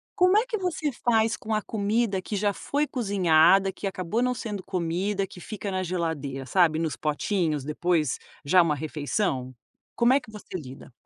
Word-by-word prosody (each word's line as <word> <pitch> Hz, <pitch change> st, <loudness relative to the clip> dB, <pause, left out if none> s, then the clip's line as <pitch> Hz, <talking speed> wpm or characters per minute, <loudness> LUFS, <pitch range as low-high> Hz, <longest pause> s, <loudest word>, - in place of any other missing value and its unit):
Como 365 Hz, +2 st, +4 dB
é 475 Hz, -, -1 dB
que 460 Hz, -3 st, -2 dB
você 330 Hz, -6 st, -1 dB
faz 225 Hz, -3 st, +1 dB
com 220 Hz, 0 st, -4 dB
a 215 Hz, -, +1 dB
comida 210 Hz, -1 st, 0 dB
que 195 Hz, +3 st, -5 dB
já 205 Hz, 0 st, +1 dB
foi 290 Hz, +8 st, -1 dB
cozinhada, 195 Hz, -4 st, +4 dB
que 195 Hz, -, -8 dB
acabou 195 Hz, +4 st, -1 dB
não 250 Hz, 0 st, +1 dB
sendo 210 Hz, -5 st, -5 dB
comida, 190 Hz, +3 st, -1 dB
que 180 Hz, -, -12 dB
fica 210 Hz, +1 st, -6 dB
na 185 Hz, -1 st, -1 dB
geladeira, 160 Hz, -7 st, -3 dB
sabe, 165 Hz, -1 st, +3 dB
nos 160 Hz, -2 st, -1 dB
potinhos, 155 Hz, -1 st, -1 dB
depois, 155 Hz, -1 st, 0 dB, 0.3 s
já 180 Hz, +6 st, +4 dB
uma 160 Hz, -2 st, +1 dB
refeição. 145 Hz, -2 st, -2 dB, 0.4 s
Como 240 Hz, +2 st, +4 dB
é 275 Hz, -, +4 dB
que 220 Hz, -, -15 dB
você 210 Hz, -2 st, -11 dB
lida? 135 Hz, -5 st, -8 dB
190 Hz, 180 wpm, -26 LUFS, 160-220 Hz, 0.4 s, Como